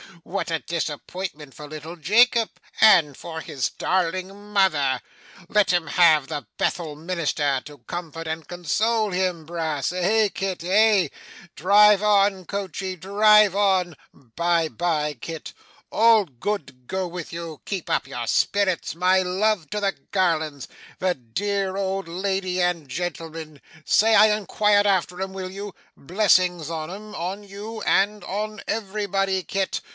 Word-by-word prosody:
What 180 Hz, -1 st, -4 dB
a 165 Hz, -, +1 dB
disappointment 155 Hz, -2 st, -5 dB
for 150 Hz, -, -10 dB
little 155 Hz, +3 st, -8 dB
Jacob, 225 Hz, +7 st, +3 dB, 0.3 s
and 165 Hz, -10 st, +6 dB
for 160 Hz, +2 st, -7 dB
his 130 Hz, -9 st, -2 dB
darling 185 Hz, +1 st, -1 dB, 0.2 s
mother! 155 Hz, -10 st, +2 dB, 0.5 s
Let 205 Hz, -1 st, +3 dB
him 175 Hz, -2 st, +1 dB
have 160 Hz, -6 st, +4 dB
the 150 Hz, -1 st, -5 dB
Bethel 160 Hz, -4 st, -2 dB
minister 150 Hz, -4 st, -1 dB
to 145 Hz, -1 st, -12 dB
comfort 165 Hz, -2 st, -7 dB
and 160 Hz, -1 st, -4 dB
console 210 Hz, +6 st, 0 dB
him, 180 Hz, -3 st, -1 dB
Brass. 160 Hz, -4 st, -2 dB
Eh, 200 Hz, +4 st, +2 dB
Kit, 190 Hz, -4 st, -4 dB
eh? 200 Hz, -2 st, +4 dB, 0.5 s
Drive 205 Hz, +3 st, +5 dB
on 200 Hz, -2 st, +3 dB
coachey, 190 Hz, -1 st, -4 dB
drive 205 Hz, +2 st, +4 dB
on. 190 Hz, -4 st, +2 dB, 0.2 s
Bye 165 Hz, +6 st, -1 dB
bye, 155 Hz, -4 st, -1 dB
Kit; 165 Hz, -2 st, -7 dB, 0.4 s
all 225 Hz, -2 st, +5 dB
good 135 Hz, -, -5 dB
go 190 Hz, -1 st, -2 dB
with 175 Hz, -1 st, -7 dB
you; 165 Hz, -3 st, -7 dB
keep 195 Hz, -4 st, -4 dB
up -, -, 0 dB
your 120 Hz, -1 st, -5 dB
spirits; 185 Hz, -, +1 dB
my 185 Hz, +2 st, +3 dB
love 185 Hz, -2 st, 0 dB
to 210 Hz, -, -1 dB
the 200 Hz, -1 st, 0 dB, 0.2 s
Garlands 160 Hz, -7 st, 0 dB, 0.3 s
the 185 Hz, -1 st, +1 dB
dear 190 Hz, -, -3 dB
old 195 Hz, -1 st, -2 dB
lady 185 Hz, +1 st, -2 dB
and 175 Hz, -4 st, 0 dB
gentleman. 160 Hz, -2 st, -6 dB, 0.2 s
Say 220 Hz, +1 st, +4 dB
I 215 Hz, 0 st, +6 dB
inquired 210 Hz, 0 st, +2 dB
after 185 Hz, -2 st, 0 dB
'em, 190 Hz, 0 st, -4 dB
will 185 Hz, -1 st, -6 dB
you? 200 Hz, 0 st, -7 dB, 0.2 s
Blessings 180 Hz, -1 st, +2 dB
on 160 Hz, -1 st, -4 dB
'em, 210 Hz, +2 st, -9 dB
on 185 Hz, +5 st, -4 dB
you, 205 Hz, +3 st, -8 dB
and 205 Hz, +1 st, +2 dB
on 215 Hz, +2 st, -4 dB
everybody, 195 Hz, -3 st, -1 dB
Kit. 195 Hz, +1 st, -2 dB
185 Hz, 140 wpm, -23 LUFS, 165-200 Hz, 0.5 s, and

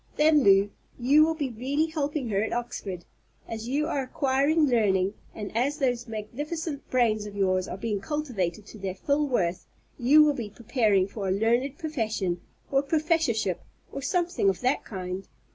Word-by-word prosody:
Then, 300 Hz, 0 st, +5 dB
Lew, 200 Hz, 0 st, +5 dB, 0.3 s
you 275 Hz, +5 st, +5 dB
will 320 Hz, +1 st, +1 dB
be 285 Hz, -5 st, -2 dB
really 270 Hz, +7 st, 0 dB
helping 300 Hz, -5 st, -2 dB
her 200 Hz, -1 st, +1 dB
at 220 Hz, -, -2 dB
Oxford. 195 Hz, -7 st, -4 dB, 0.4 s
As 225 Hz, 0 st, -5 dB
you 285 Hz, +4 st, 0 dB
are 290 Hz, -4 st, -1 dB
acquiring 275 Hz, +4 st, +2 dB
learning, 200 Hz, -7 st, +2 dB, 0.2 s
and 210 Hz, -1 st, -6 dB
as 275 Hz, +6 st, +1 dB
those 245 Hz, -4 st, 0 dB
magnificent 280 Hz, +8 st, -5 dB
brains 220 Hz, -4 st, +2 dB
of 205 Hz, -, -9 dB
yours 185 Hz, -2 st, +1 dB
are -, -, -5 dB
being 205 Hz, -1 st, -2 dB
cultivated 215 Hz, -, -2 dB
to 215 Hz, -, -12 dB
their 190 Hz, -1 st, -4 dB
full 285 Hz, +8 st, 0 dB
worth, 180 Hz, -8 st, -1 dB, 0.3 s
you 285 Hz, +5 st, +7 dB
will 300 Hz, -1 st, +3 dB
be 235 Hz, -6 st, -5 dB
preparing 210 Hz, -3 st, +1 dB
for 200 Hz, -1 st, -5 dB
a -, -, +1 dB
learned 235 Hz, +7 st, +1 dB
profession, 220 Hz, -, -2 dB, 0.3 s
or 275 Hz, -, +4 dB
a -, -, -1 dB
professorship, 295 Hz, -, +1 dB, 0.3 s
or 275 Hz, -, -5 dB
something 350 Hz, -, +1 dB
of 190 Hz, -, -2 dB
that 255 Hz, +2 st, +1 dB
kind. 185 Hz, -1 st, -5 dB
240 Hz, 175 wpm, -27 LUFS, 200-290 Hz, 0.4 s, you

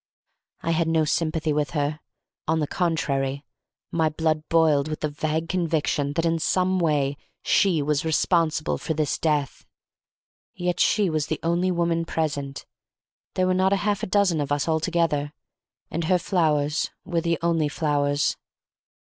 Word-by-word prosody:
I 165 Hz, -, -1 dB
had 165 Hz, 0 st, +1 dB
no 160 Hz, -1 st, +2 dB
sympathy 155 Hz, 0 st, 0 dB
with 145 Hz, -2 st, 0 dB
her; 145 Hz, +1 st, -1 dB, 0.5 s
on 160 Hz, +1 st, +2 dB
the 150 Hz, -, +1 dB
contrary, 140 Hz, -5 st, -1 dB, 0.5 s
my 160 Hz, -2 st, +2 dB
blood 155 Hz, 0 st, 0 dB
boiled 155 Hz, -3 st, +3 dB
with 155 Hz, 0 st, -5 dB
the 150 Hz, -, 0 dB
vague 155 Hz, +2 st, -2 dB
conviction 160 Hz, -5 st, 0 dB
that 165 Hz, +2 st, 0 dB
in 165 Hz, 0 st, +1 dB
some 185 Hz, +3 st, +1 dB
way 145 Hz, -4 st, +1 dB, 0.3 s
she 175 Hz, -7 st, +3 dB
was 150 Hz, 0 st, 0 dB
responsible 160 Hz, -1 st, +1 dB
for 160 Hz, -, -3 dB
this 150 Hz, -2 st, 0 dB
death. 150 Hz, -4 st, -1 dB, 0.9 s
Yet 180 Hz, -1 st, -2 dB
she 210 Hz, -2 st, +3 dB
was 155 Hz, -1 st, -1 dB
the -, -, -2 dB
only 170 Hz, +2 st, +1 dB
woman 170 Hz, -1 st, 0 dB
present—there 150 Hz, +3 st, -5 dB
were 185 Hz, -, +2 dB
not 190 Hz, +1 st, +3 dB
a 200 Hz, -, 0 dB
half 205 Hz, -2 st, +1 dB
a -, -, -2 dB
dozen 185 Hz, -5 st, +2 dB
of 145 Hz, 0 st, -4 dB
us 145 Hz, +1 st, 0 dB
altogether—and 160 Hz, 0 st, -2 dB
her 180 Hz, +2 st, +3 dB
flowers 155 Hz, -4 st, +1 dB, 0.2 s
were 170 Hz, -2 st, -1 dB
the 170 Hz, 0 st, 0 dB
only 165 Hz, -3 st, +2 dB
flowers. 145 Hz, -1 st, 0 dB
160 Hz, 150 wpm, -24 LUFS, 150-170 Hz, 0.9 s, boiled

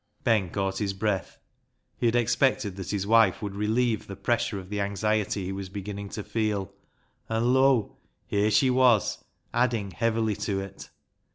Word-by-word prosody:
Ben 105 Hz, -5 st, +2 dB
caught 95 Hz, +1 st, -2 dB
his 100 Hz, -2 st, -1 dB
breath. 95 Hz, -3 st, -2 dB, 0.6 s
He 120 Hz, -, 0 dB
had 115 Hz, -, +1 dB
expected 120 Hz, -3 st, +2 dB
that 95 Hz, -2 st, -6 dB
his 100 Hz, -2 st, -1 dB
wife 110 Hz, -3 st, +4 dB
would 100 Hz, -1 st, -3 dB
relieve 110 Hz, +2 st, 0 dB
the 95 Hz, -, -7 dB
pressure 105 Hz, +1 st, 0 dB
of 95 Hz, -1 st, -8 dB
the 105 Hz, -, -2 dB
52 -, -, 0 dB
BECKSIDE 100 Hz, -, +1 dB
LIGHTS -, -, -6 dB
anxiety 105 Hz, -2 st, 0 dB
he 95 Hz, -, -3 dB
was 95 Hz, -1 st, -5 dB
beginning 100 Hz, +1 st, -6 dB
to 105 Hz, -, -5 dB
feel, 105 Hz, -2 st, -2 dB, 0.6 s
and 115 Hz, +2 st, +2 dB
lo! 130 Hz, -4 st, +3 dB, 0.3 s
here 105 Hz, +1 st, +1 dB
she 110 Hz, +5 st, +4 dB
was 125 Hz, -5 st, +3 dB, 0.3 s
adding 115 Hz, -5 st, +1 dB
heavily 110 Hz, +2 st, 0 dB
to 100 Hz, -1 st, -2 dB
it. 95 Hz, 0 st, -8 dB
105 Hz, 180 wpm, -27 LUFS, 100-115 Hz, 0.6 s, wife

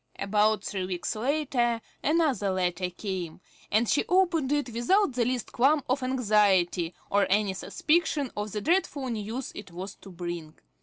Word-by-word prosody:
About 210 Hz, +1 st, +2 dB
three 190 Hz, -2 st, -3 dB
weeks 180 Hz, +2 st, -3 dB
later 245 Hz, -1 st, 0 dB, 0.2 s
another 295 Hz, -, +2 dB
letter 180 Hz, -1 st, 0 dB
came, 180 Hz, -3 st, -5 dB, 0.3 s
and 220 Hz, +3 st, +3 dB
she 290 Hz, -, +2 dB
opened 345 Hz, -7 st, +2 dB
it 290 Hz, -5 st, 0 dB
without 310 Hz, -, +2 dB
the 240 Hz, -1 st, +1 dB
least 250 Hz, -1 st, -2 dB
qualm 280 Hz, +4 st, +3 dB
of 260 Hz, +2 st, 0 dB
anxiety, 205 Hz, -9 st, +2 dB, 0.2 s
or 200 Hz, -1 st, +3 dB
any 200 Hz, 0 st, +2 dB
suspicion 305 Hz, -, 0 dB
of 210 Hz, 0 st, -3 dB
the 210 Hz, -, -3 dB
dreadful 300 Hz, -, 0 dB
news 230 Hz, +3 st, -4 dB
it -, -, -9 dB
was 185 Hz, +3 st, -6 dB
to -, -, -14 dB
bring. 175 Hz, -3 st, -6 dB
220 Hz, 155 wpm, -28 LUFS, 190-275 Hz, 0.3 s, and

